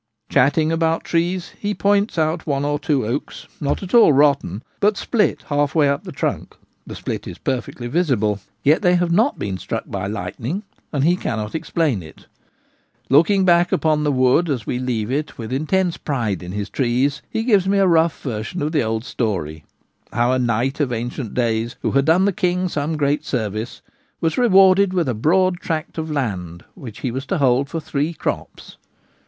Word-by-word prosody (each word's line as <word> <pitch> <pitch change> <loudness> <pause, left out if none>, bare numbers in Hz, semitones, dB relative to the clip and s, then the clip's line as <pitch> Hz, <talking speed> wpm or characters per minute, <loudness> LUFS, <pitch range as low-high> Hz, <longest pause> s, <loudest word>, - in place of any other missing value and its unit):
Chatting 155 +4 +3
about 165 0 +1
trees, 175 +2 -1
he 205 0 -2
points 200 -1 +1
out 160 +1 0
one 140 -1 0
or 145 0 0
two 140 -4 0
oaks, 125 +7 -4
not 145 +6 -1
at 185 - -8
all 235 -9 +7
rotten, 140 - +2 0.2
but 210 0 +2
split 220 -4 0
half 145 0 0
way 150 -3 +4
up 140 +6 -1
the 180 - -6
trunk 140 - -3
— - - -37
the - - -7
split - - -5
is - - -7
perfectly 125 -1 -3
visible 120 - +1
— 110 +1 -45
yet 150 +3 +4
they 180 -3 +4
have 175 -1 +1
not 225 +11 +2
been 95 -2 -4
struck - - -4
by 100 0 -4
lightning; 110 - -4 0.3
and 140 -3 0
he 170 +4 +4
cannot 110 - -3
explain 160 - -1
it 80 -1 -14 0.9
Looking 185 +7 +4
back 175 0 +4
upon 155 -1 +1
the 150 - +2
wood 130 +6 +3
as 125 -7 -2
we 125 - -2
leave 120 -3 -2
it 150 +3 -2
with 115 +1 -5
intense 170 +5 0
pride 115 - -2
in 90 0 -7
his 105 +1 -4
trees, 135 +3 0
he 225 - -2
gives 205 -6 +3
me 200 +1 +2
a 195 - +4
rough 165 -2 +3
version 120 +6 -4
of 150 - -1
the 155 -3 +2
old 110 +1 -2
story: 80 - -3 0.5
how 120 +3 +1
a 130 - +1
knight 125 +4 0
of 140 -4 0
ancient 120 0 -4
days, 115 -1 0
who - - +1
had 140 0 +2
done 170 +5 +4
the 200 - +2
king 180 -1 0
some 155 -1 -2
great 145 0 +1
service, 110 -1 -4 0.4
was 165 -2 0
rewarded 195 -4 +5
with 170 -5 +1
a 130 - 0
broad 175 - +2
tract 160 -2 -4
of 160 0 -4
land 95 - -3
which 115 -5 -10
he 130 - -2
was 135 +3 -5
to 195 - 0
hold 135 -1 +2
for 165 - -3
three 150 +1 -2
crops. - - -5
145 Hz, 195 wpm, -20 LUFS, 120-170 Hz, 0.9 s, all